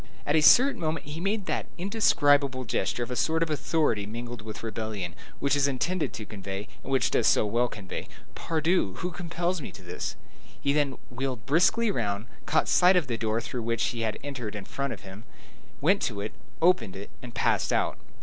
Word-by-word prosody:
At 145 - +2
a 155 - +5
certain 260 - +6
moment 155 -2 -1
he 150 +2 -6
made 200 +2 -1
that - - -2
indescribable 145 - +3
gesture 120 +1 -1
of 120 - -6
a - - -1
sort 160 +5 +2
of 160 - -2
authority 150 -9 +1
mingled 120 +1 -6
with 110 0 -8
rebellion, 110 -5 -4 0.2
which 140 0 +2
is 140 -1 +3
intended 160 +6 -1
to 110 - -6
convey, 100 0 -6
and 135 - -7
which 135 - +2
does 115 - +3
so - - +4
well 120 +4 +2
convey, 100 -5 -6 0.3
"Pardieu! 160 - 0
who 180 +2 -3
compels 175 0 -2
me - - -6
to 95 - -13
this?" 90 0 -4 0.5
Then 140 -1 +2
he - - -12 0.2
wheeled 125 -3 -3
briskly 180 - +3
round, 105 - -2 0.2
caught 160 - +2
sight 180 +1 +6
of 180 -4 +3
the 120 -3 -2
door 110 0 0
through 125 +1 -4
which 115 0 0
he 115 - -4
had 110 -1 -1
entered 125 -7 -5
in 100 -2 -6
front 140 -1 -3
of - - -6
him, 95 +2 -10 0.6
went 190 +7 +4
to 105 -4 -1
it, 105 +2 -3 0.3
opened 125 - +3
it, 100 +1 -8
and 120 -2 -10
passed - - +2
out. - - +1
130 Hz, 200 wpm, -28 LUFS, 110-160 Hz, 0.6 s, certain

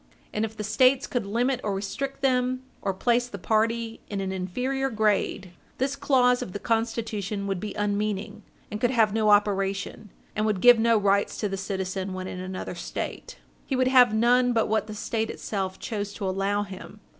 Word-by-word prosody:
And 210 - 0
if 220 0 -4
the 210 - -3
States 255 +5 +3
could 240 -5 -2
limit 245 +4 0
or 205 -2 -1
restrict 270 +8 -4
them, 255 -1 +1 0.2
or 195 - 0
place 240 +5 +1
the 205 - -7
party 225 +3 0
in 200 - -3
an 190 -1 -2
inferior 250 +9 -2
grade, 210 -4 0 0.3
this 270 +2 0
clause 255 -3 +3
of 180 - -6
the 205 - -4
Constitution 225 -3 -2
would 195 -2 -2
be 210 +2 -5
unmeaning, 205 0 -2 0.3
and 210 +1 -5
could 245 - +3
have 225 -5 +3
no 215 -1 +2
operation, 200 0 +1 0.3
and 215 +1 +1
would 210 -3 0
give 245 +2 +7
no 230 0 +4
rights 200 0 +1
to 210 - +1
the 195 - -3
citizen 190 -1 -3
when 185 0 -5
in 185 - -6
another 185 0 -5
State. - - -6 0.3
He 270 - -1
would 255 0 +2
have 250 -3 +6
none 245 +3 +3
but 225 -1 +2
what 220 0 0
the 215 - -7
State 225 0 -2
itself 190 -3 -3
chose 205 -2 -4
to 200 - -3
allow 195 +2 0
him. 195 +1 -10
215 Hz, 190 wpm, -26 LUFS, 200-245 Hz, 0.3 s, give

